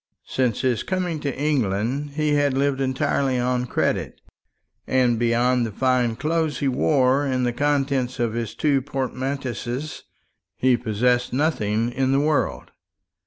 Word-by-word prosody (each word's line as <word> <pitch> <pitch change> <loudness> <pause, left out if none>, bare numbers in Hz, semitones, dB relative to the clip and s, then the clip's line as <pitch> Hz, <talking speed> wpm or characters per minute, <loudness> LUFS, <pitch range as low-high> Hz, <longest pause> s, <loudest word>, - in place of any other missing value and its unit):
Since 125 -4 0
his 125 -4 +1
coming 180 -4 -2
to 140 -3 -3
England 135 0 -1
he 155 0 0
had 145 -2 +2
lived 140 -1 +1
entirely 130 0 0
on 125 0 0
credit; - - -1 0.7
and, 125 -3 +2
beyond 120 +1 +2
the 115 - -3
fine 125 0 +1
clothes 155 +3 -1
he 140 - -1
wore 135 +1 +2
and 130 -3 0
the 120 - 0
contents 135 -2 0
of 120 -2 0
his 115 -2 -4
two 140 -3 +2
portmanteaus, 130 0 -4 0.5
he 130 -1 +3
possessed 120 +2 0
nothing 120 -6 0
in 135 +1 0
the 135 - +3
world. 145 -2 0
130 Hz, 140 wpm, -23 LUFS, 120-140 Hz, 0.7 s, he